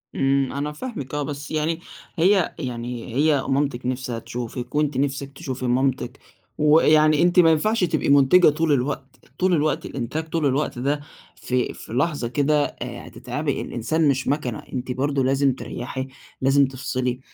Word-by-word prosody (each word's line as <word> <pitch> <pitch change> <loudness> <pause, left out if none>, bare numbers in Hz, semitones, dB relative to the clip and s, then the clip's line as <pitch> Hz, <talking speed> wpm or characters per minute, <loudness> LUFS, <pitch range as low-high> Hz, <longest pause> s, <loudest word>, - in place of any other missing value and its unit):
إمم، 135 0 +1
أنا 145 +2 -2
فاهمِك 150 - -7
آه، 145 - -1
بس 145 +1 -6
يعني 160 +1 0 0.4
هي 185 +1 +3
يعني 120 -3 -5
هي 145 0 +3
مامتِك 135 -2 0
نِفْسها 125 -2 -2
تشوفِك، 120 +2 -6
وأنتِ 150 -2 +1
نِفْسِك 140 0 -1
تشوفي 130 -5 -5
مامتِك، 130 0 0 0.4
و 150 +1 +5
يعني 155 -1 +4
أنتِ 175 +1 +4
ما 165 -2 +7
ينفعش 215 +7 +1
تبقي 160 -4 0
منتجة 145 +6 +6
طُول 155 +1 0
الوقت، 135 0 -3
طُول 185 0 +3
الوقت 155 -2 +1
إنتاج، 145 +5 -4
طُول 160 -1 0
الوقت، 140 -2 0
ده 140 +3 0 0.4
في 125 -1 -1
في - - -10
لحظة 140 0 0
كده 145 +4 +1
هتتعبي، - - -4
الإنسان 155 +7 0
مش 135 -1 +1
ماكنة، 130 -6 -1
أنتِ 125 -1 -3
برضه 135 +1 0
لازم 135 +1 +2
تريحي، 130 +1 -5 0.3
لازم 135 +1 +4
تفصِلي، 130 -1 -3
140 Hz, 155 wpm, -23 LUFS, 130-155 Hz, 0.4 s, ما